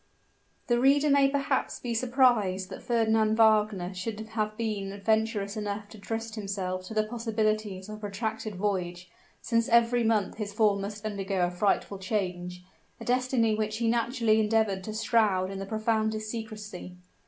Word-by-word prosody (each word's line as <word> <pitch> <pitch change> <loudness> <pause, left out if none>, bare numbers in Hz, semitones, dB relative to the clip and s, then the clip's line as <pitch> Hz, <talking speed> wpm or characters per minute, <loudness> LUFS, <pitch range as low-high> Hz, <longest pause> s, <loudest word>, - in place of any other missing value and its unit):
The 240 -1 +2
reader 280 +3 +4
may 275 -1 +5
perhaps 275 -1 -1
be 240 -2 -3
surprised 230 -6 +2
that - - -7
Fernand 220 -2 +2
Wagner 210 -4 +3
should 210 +4 -4
have 215 -1 -2
been 205 -3 -3
venturous 220 -1 0
enough 205 -1 -4
to 220 - -12
trust 225 +2 -4
himself 190 -3 -4
to 220 - -7
the 215 - +3
possibilities 215 -3 -2
of 215 0 -7
a - - -14
protracted 215 +1 -4
voyage, 180 -3 -2 0.3
since 230 -1 +1
every 235 +1 +4
month 220 -3 +1
his 210 -2 -4
form 205 -2 +2
must 205 +1 -6
undergo 195 -3 -1
a 175 - -2
frightful 200 +1 0
change 180 -3 -3 0.4
a - - -8
destiny 250 -2 +2
which 215 0 -1
he 230 0 0
naturally 230 -1 +2
endeavored 215 -3 +1
to 215 - -5
shroud 210 -4 +2
in 195 - -5
the 195 - -5
profoundest 220 0 -1
secrecy. 210 -5 -7
215 Hz, 160 wpm, -28 LUFS, 200-225 Hz, 0.4 s, may